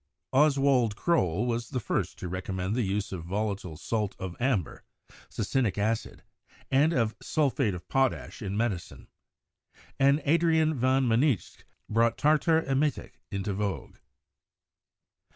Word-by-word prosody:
Oswald 135 -5 +3
Croll 110 - +1
was 115 -1 -2
the 125 - -2
first 110 - -2
to 90 - -6
recommend 95 +2 -3
the 125 - +1
use 100 -1 -2
of 90 -4 -5
volatile 95 -3 -3
salt 105 +1 -2
of 95 -2 -6
amber 120 - -1 0.5
(succinic 110 -1 -1
acid) 110 +2 -2 0.5
and 145 +4 +4
of 115 -7 0
sulphate 135 -8 0
of 90 - -10
potash 135 -2 0
in 100 -1 -3
medicine; 110 -6 -3 0.9
and 140 +2 +4
Adrian 160 0 +3
van 130 0 +2
Mynsicht 120 - 0 0.2
brought 115 +1 +2
tartar 155 +2 +3
emetic 140 +2 -1
into 100 0 -3
vogue. 100 0 -4
115 Hz, 125 wpm, -28 LUFS, 100-135 Hz, 0.9 s, and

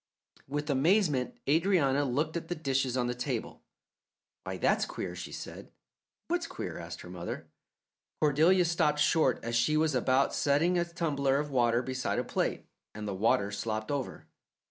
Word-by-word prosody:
With 145 +2 -2
amazement 150 -2 +2
Adrianna 145 -3 +3
looked 150 +5 -1
at 170 -1 -3
the 175 - -2
dishes 135 -4 0
on 125 - +1
the 120 - -1
table. 125 0 -4 0.8
"Why, - - -4
that's - - +2
queer!" - - -5
she - - -7
said. - - -8 0.6
"What's 345 -1 -1
queer?" 365 - -6
asked - - -7
her - - -10
mother. - - -6 0.7
Cordelia 160 +5 +4
stopped 160 -3 +2
short 150 -3 +3
as 115 0 -2
she 150 +7 +3
was 155 -1 +2
about 130 +2 +2
setting 150 +6 +2
a 170 - +1
tumbler 140 -5 0
of 145 0 -2
water 120 -2 +2
beside 130 0 -2
a - - +1
plate, - - -2 0.3
and 105 0 -5
the 100 - -2
water 100 0 +2
slopped 110 +2 -3
over. 140 -3 -4
140 Hz, 165 wpm, -30 LUFS, 125-160 Hz, 0.8 s, Cordelia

